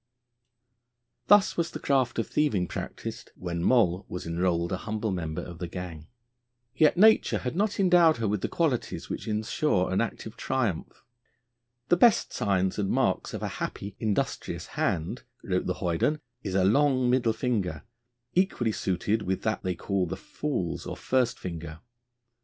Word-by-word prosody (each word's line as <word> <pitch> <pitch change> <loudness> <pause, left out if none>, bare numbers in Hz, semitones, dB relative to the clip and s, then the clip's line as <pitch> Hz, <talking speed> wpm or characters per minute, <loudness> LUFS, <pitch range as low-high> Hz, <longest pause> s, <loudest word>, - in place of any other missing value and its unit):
Thus 205 -1 +6
was 170 -1 0
the - - -7
craft 135 -3 +1
of 115 - +1
thieving 140 -12 +1
practised - - -6
when 85 -2 -4
Moll 95 -7 +3
was 90 - -5
enrolled 85 0 0
a 95 - 0
humble 105 +1 -3
member 80 -4 -3
of 85 -1 -9
the 90 - -3
gang. 85 -3 -7 0.7
Yet 155 +4 +4
nature 220 +3 +5
had 125 +4 -4
not 205 +2 0
endowed 175 -4 +5
her 115 -2 -1
with 100 -1 -1
the - - 0
qualities 155 -8 -1
which - - -5
ensure 105 -2 0
an - - +2
active 115 -1 -4
triumph. 120 -10 -2 0.9
'The 175 - +5
best 230 +3 +4
signs 95 -1 0
and 100 -2 0
marks - - 0
of - - -5
a - - 0
happy, 100 0 -4
industrious 110 -3 -2
hand,' 80 0 -1 0.2
wrote - - -1
the - - -1
hoyden, 90 - 0 0.2
'is 95 -2 -4
a 95 - +3
long 130 +3 +3
middle 125 -2 +3
finger, 105 - -2 0.5
equally 175 -11 +1
suited 100 +3 -1
with 95 -1 -2
that 110 0 0
they 90 -1 -2
call 95 +1 -1
the - - -4
fool's 145 - -3
or - - -5
first 125 -2 +1
finger.' 80 -3 -6
105 Hz, 160 wpm, -27 LUFS, 90-130 Hz, 0.9 s, Thus